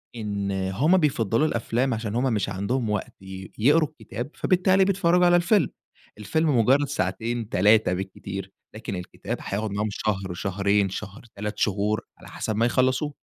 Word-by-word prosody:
إن 100 -3 -3
هم 95 - +2
بيفضّلوا 130 - +2
الأفلام، 120 +1 0
عشان 110 -1 -3
هم 125 0 +1
مش 105 -2 -1
عندهم 105 +5 -1
وقت 105 -2 -2
ي 95 0 -9
يقروا 150 +7 +4
الكتاب، 120 -2 -7
فبالتالي 185 +1 +3
بيتفرّجوا 180 -2 +3
على 175 0 +5
الفيلم. 175 - +3 0.5
الفيلم 145 - +1
مُجرّد 135 +5 +4
ساعتين، 115 +1 -2
3 105 0 +4
بالكتير، 95 +1 -6 0.2
لكن 110 -2 -5
الكتاب 90 0 -5
هياخُد 105 +2 -3
معاهم 105 +2 -1
شهر، 100 -3 -2
شهرين، 100 +2 +1
شهر، 100 +5 -7
3 105 +1 -4
شهور 105 +1 +1 0.2
على - - -14
حسب 110 - -3
ما 115 +2 +2
يخلّصوه. 130 +4 +1
110 Hz, 155 wpm, -25 LUFS, 100-135 Hz, 0.5 s, على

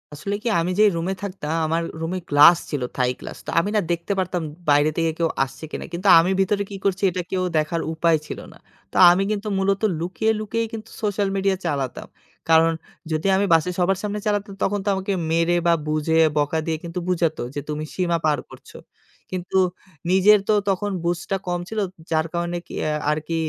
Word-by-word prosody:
আসলে 200 +7 -3
কি? - - -2
আমি 175 +2 -1
যেই 215 -1 +7
রুমে 175 +3 -1
থাকতাম, 175 -5 -4
আমার 165 +1 0 0.2
রুমে 175 +3 -2
গ্লাস 150 +4 +8
ছিল 145 -4 -3 0.2
থাই 125 -1 +2
গ্লাস। - - -8
তো - - -7
আমি 185 +5 -1
না - - +4
দেখতে 170 +4 -1
পারতাম 180 -1 -1 0.3
বাইরে 145 +1 +5
থেকে 165 -1 +1
কেউ 165 - +2
আসছে 135 +3 -9
কিনা। - - -5
কিন্তু 180 +4 -2
আমি 175 +3 +2
ভিতরে 200 +1 +1
কি 200 - -7
করছি, 195 0 0
এটা 180 +1 -2
কেউ 185 -1 0
দেখার 155 +2 0
উপায় 165 0 +3
ছিল - - -6
না। - - -17 0.3
তো - - -18 0.2
আমি 185 +2 +2
কিন্তু 210 0 -3
মূলত 195 0 +1 0.2
লুকিয়ে, 185 +6 0
লুকিয়েই 225 +2 -2
কিন্তু 225 0 -7
সোশ্যাল 205 -1 0
মিডিয়া 195 0 +1
চালাতাম। 140 -6 -3 0.4
কারণ 165 0 +5 0.4
যদি 155 +4 0
আমি 200 +1 +2
বাসে 165 +2 +3
সবার 185 +2 +2
সামনে 210 0 -2
চালাতাম, 205 -1 -1
তখন 205 +1 0
তো - - -6
আমাকে 190 +1 -2 0.2
মেরে, 165 +1 +2
বা 170 - +5
বুঝে 155 +1 +1 0.2
বকা 150 +2 +1
দিয়ে 160 -1 -1
কিন্তু 170 +1 -4
বুঝাত 170 -3 +1 0.2
যে, 145 - -1
"তুমি 150 0 -3
সীমা 175 -2 +1
পার 150 -2 +2
করছ।" - - -14 0.6
কিন্তু 185 +1 -2 0.5
নিজের 200 +3 +6
তো 215 - +4 0.2
তখন 205 +2 0
বুঝটা 175 +2 -1
কম 175 0 -1
ছিল, 220 - -3 0.3
যার 160 0 +2
কারণে 175 0 -2
কি - - -11 0.2
আ - - 0 0.2
আরকি 155 +2 -2
175 Hz, 195 wpm, -22 LUFS, 160-195 Hz, 0.6 s, গ্লাস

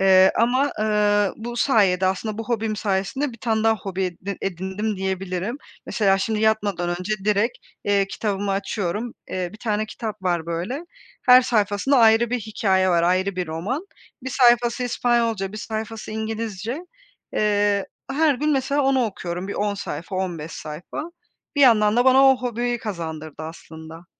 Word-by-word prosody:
eee, 190 0 +6
ama, 255 +5 +2
eee, 210 -1 +2
bu 240 +2 -6
sayede 195 -8 +3
aslında 210 +3 -2
bu 225 - -3
hobim 225 -2 -1
sayesinde 205 +8 -1
1 230 - -13
tane 220 -1 0
daha 225 0 +4
hobi 190 -2 -3
e 180 -2 -4
d 200 - -2
edindim 195 +3 -3
diyebilirim. 190 +4 -3 0.3
Mesela, 195 -3 +2
şimdi, 215 +2 -1
yatmadan 205 -5 +1
önce 185 +4 -3
direkt, 215 +4 +1 0.3
eee, 200 -1 +2
kitabımı 200 -1 -2
açıyorum. 200 +3 -2 0.2
Eee, 180 -1 -2
1 215 - -12
tane 215 -1 -1
kitap 215 -3 -6
var, 175 -3 0
böyle, 185 - -4 0.4
her 250 0 +8
sayfasında 225 +3 +2
ayrı 225 +1 +5
bir 250 - 0
hikâye 195 -3 +1
var, 170 -1 +3
ayrı 185 +2 +1
bir 180 - -1
roman. 205 - -3 0.4
1 260 - -4
sayfası 240 -1 +4
İspanyolca, 230 -5 0
1 215 - -7
sayfası 220 0 -5
İngilizce. 220 +2 -4 0.5
Eee, 205 -1 +2 0.2
her 300 +1 +3
gün 300 +4 0
mesela 280 +1 +1
onu 265 -2 +3
okuyorum, 180 -2 -4
bir - - -4
10 205 0 -1
sayfa, 180 -1 -5
15 170 -4 -3
sayfa. 175 - -7 0.5
Bir - - +2
yandan 215 -4 +5
da 245 - +4
bana 265 +1 +6
o 265 - -1
hobiyi 245 -1 -2
kazandırdı 160 -7 -6
aslında. 160 +1 -10
210 Hz, 160 wpm, -23 LUFS, 190-235 Hz, 0.5 s, her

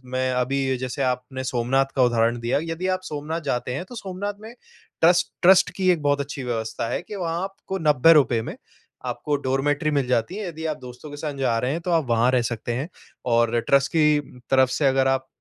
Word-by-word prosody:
मैं 130 0 +1
अभी 130 +1 0
जैसे 130 +2 -3
आपने 125 +1 -4
सोमनाथ 130 +2 +1
का 130 - +5
उदाहरण 120 -1 +2
दिया। 120 +4 +1
यदि 165 +3 -3
आप 185 - -8
सोमनाथ 155 0 -4
जाते 125 0 -2
हैं, 140 - -3
तो 245 - -11
सोमनाथ 200 0 -5
में 220 +2 -10 0.5
ट्रस्ट 175 +2 +4
ट्रस्ट 185 +1 +6
की 185 -1 +2
एक 170 -3 0
बहुत 145 0 +2
अच्छी 140 -1 -6
व्यवस्था 115 -1 -3
है - - -2
कि 210 - -8
वहाँ 170 -2 -2
आपको 195 0 -5
₹90 145 -4 +5
में - - -6 0.5
आपको 150 -1 -2
डॉरमिटरी 145 +3 +1
मिल 140 -3 0
जाती 125 - 0
है। 210 -3 -4
यदि 160 -1 -6
आप - - -13
दोस्तों 125 +4 -10
के 145 - -8
संग 145 -2 -5
जा 120 -4 +1
रहे 125 +3 -1
हैं, 165 - -3
तो 180 - -3
आप 165 -3 +2
वहाँ 115 +2 +3
रह 125 -1 +3
सकते 115 +1 -3
हैं। 135 +7 -3 0.5
और 115 0 +2
ट्रस्ट 140 0 +3
की 150 -2 +4 0.3
तरफ़ 130 -1 +5
से 145 - 0
अगर 135 0 +3
आप 135 0 0
140 Hz, 215 wpm, -23 LUFS, 125-165 Hz, 0.5 s, ट्रस्ट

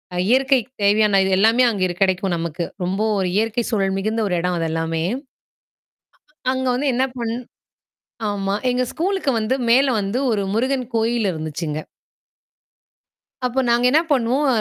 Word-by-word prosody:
அ - - -2
இயற்கைக்கு 260 -1 +2
தேவையான 205 -1 +4
இது 190 - 0
எல்லாமே 225 +4 +4
அங்க 205 -4 -3
இரு 175 - -4
கெடைக்கும் 190 -1 +1
நமக்கு. 170 +1 -3 0.2
ரொம்ப 190 +3 -2 0.2
ஒரு 185 - 0
இயற்கை 225 +2 0
சூழல் 195 -3 0
மிகுந்த 220 +3 -1
ஒரு 180 - 0
எடம். 180 -1 -1
அது 165 -1 -1
எல்லாமே! 165 0 -1 1.5
அங்க 260 0 -2
வந்து 275 +3 -1
என்னா 260 +2 +2
பண்ணு 230 0 -2 0.9
ஆமா. 195 -1 -2 0.2
எங்க 250 +1 +1
ஸ்கூலுக்கு 375 -4 -1
வந்து, 220 +4 0
மேல 260 +2 +4
வந்து 200 +5 -2
ஒரு 205 -3 0
முருகன் 255 +2 0
கோயில் 225 -2 +1
இருந்துச்சுங்க. 155 -1 -4 1.7
அப்போ 250 +2 0
நாங்க 240 +1 +3
என்னா 315 +3 +5
பண்ணுவோம். 260 +3 +1
220 Hz, 150 wpm, -21 LUFS, 190-255 Hz, 1.7 s, என்னா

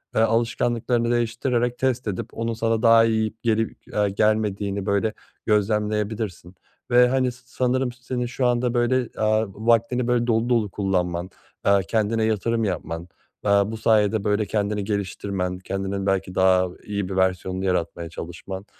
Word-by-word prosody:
eee, - - +4
alışkanlıklarını 115 +1 +1
değiştirerek 120 +1 0
test 130 -2 0
edip 100 -3 -3
onun 115 0 -2
sana 115 0 0
daha 115 -1 +6
iyi 110 -1 0
gelip, 115 -1 -1
eee, 105 -1 +2
gelmediğini, 100 -1 0
böyle, 100 +2 +1 0.3
gözlemleyebilirsin 105 -3 -1 0.4
ve, 125 0 +6
hani, 130 0 +1
sanırım 125 +1 -1
senin 125 0 -4
şu 125 +1 -2
anda, 120 0 +1
böyle, 120 0 +1
aaa, 110 +1 +3
vaktini, 115 +4 +1
böyle, 120 -1 +1
dolu 115 +1 +1
dolu 115 -4 +2
kullanman, 90 -3 -1 0.4
eee, 100 0 +5
kendine 110 0 +1
yatırım 110 +1 0
yapman, 85 -3 -3 0.4
aaa, 100 +1 +3
bu 115 - -5
sayede, 110 -1 +2
böyle, 105 +1 +1
kendini 105 0 -1
geliştirmen, 95 -2 -3
kendinin 95 +1 -3
belki 95 -1 -1
daha 95 -1 +4 0.2
iyi 100 -2 -3
bir 95 - -4
versiyonunu 95 0 0
yaratmaya 85 -2 -1
çalışman, 95 +4 -7
110 Hz, 145 wpm, -23 LUFS, 95-120 Hz, 0.4 s, daha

